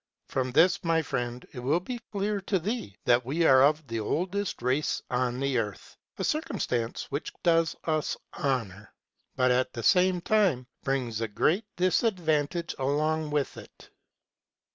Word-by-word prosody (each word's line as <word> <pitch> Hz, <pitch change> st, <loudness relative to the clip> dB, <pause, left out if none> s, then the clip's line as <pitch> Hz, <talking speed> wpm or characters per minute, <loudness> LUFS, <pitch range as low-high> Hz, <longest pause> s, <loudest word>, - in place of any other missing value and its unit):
From 130 Hz, -1 st, -1 dB
this, 165 Hz, +6 st, +4 dB
my 165 Hz, -1 st, +2 dB
friend, 120 Hz, -3 st, -3 dB
it -, -, -6 dB
will 140 Hz, +7 st, +1 dB
be 240 Hz, +7 st, -6 dB
clear 205 Hz, 0 st, -1 dB
to 195 Hz, -, +2 dB
thee 185 Hz, -, -4 dB
that 120 Hz, +1 st, +4 dB
we 155 Hz, +7 st, 0 dB
are 130 Hz, -3 st, +7 dB
of 150 Hz, +2 st, +3 dB
the 115 Hz, -3 st, -3 dB
oldest 180 Hz, -, -2 dB
race 130 Hz, +4 st, +1 dB
on 125 Hz, 0 st, 0 dB
the 135 Hz, -2 st, +1 dB
earth, 105 Hz, -3 st, -5 dB, 0.2 s
ŌĆö -, -, -5 dB
a -, -, 0 dB
circumstance 125 Hz, -, -1 dB
which 145 Hz, -, -3 dB
does 165 Hz, -2 st, +3 dB
us 155 Hz, -2 st, -1 dB, 0.2 s
honor, 110 Hz, -8 st, -2 dB, 0.4 s
but 125 Hz, -1 st, +3 dB
at 125 Hz, +1 st, +1 dB
the 115 Hz, -, -5 dB
same 185 Hz, -, +4 dB
time 175 Hz, -9 st, +2 dB, 0.2 s
brings 125 Hz, -5 st, -1 dB
great 180 Hz, -, +2 dB
disadvantage 170 Hz, -4 st, +1 dB
along 155 Hz, +3 st, 0 dB
with 145 Hz, -2 st, -1 dB
it. -, -, -14 dB
150 Hz, 155 wpm, -28 LUFS, 125-175 Hz, 0.4 s, are